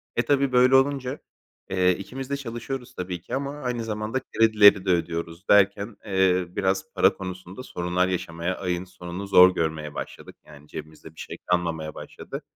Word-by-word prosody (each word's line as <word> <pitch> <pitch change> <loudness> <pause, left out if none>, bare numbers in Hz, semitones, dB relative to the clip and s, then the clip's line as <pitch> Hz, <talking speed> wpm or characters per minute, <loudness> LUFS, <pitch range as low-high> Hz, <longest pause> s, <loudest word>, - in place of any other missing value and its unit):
E 120 - +3
tabii, 140 +1 +2
böyle 125 +1 +5
olunca, 135 0 +1 0.5
eee, 90 -1 +3
ikimiz 130 +7 -7
de 140 - -1
çalışıyoruz 125 0 -6
tabii 90 -2 -5
ki 120 +8 -5
ama 140 +1 -2
aynı 125 -3 -2
zamanda 110 +3 -2
kredileri 105 -4 +5
de - - -1
ödüyoruz 85 +1 -2
derken, 100 +1 +3
eee, 95 -3 +2
biraz 95 +1 -1
para - - +4
konusunda 95 +4 -8
sorunlar 90 -3 -1
yaşamaya 85 0 -3
ayın 90 -2 -2
sonunu 90 +1 -8
zor 95 -1 +7
görmeye 80 -3 -2
başladık. - - -8
Yani 75 0 -15
cebimizde 80 +1 -10
bir - - -15
şey - - -7
kalmamaya 85 -3 -1
başladı. - - -8
95 Hz, 160 wpm, -25 LUFS, 90-120 Hz, 0.5 s, zor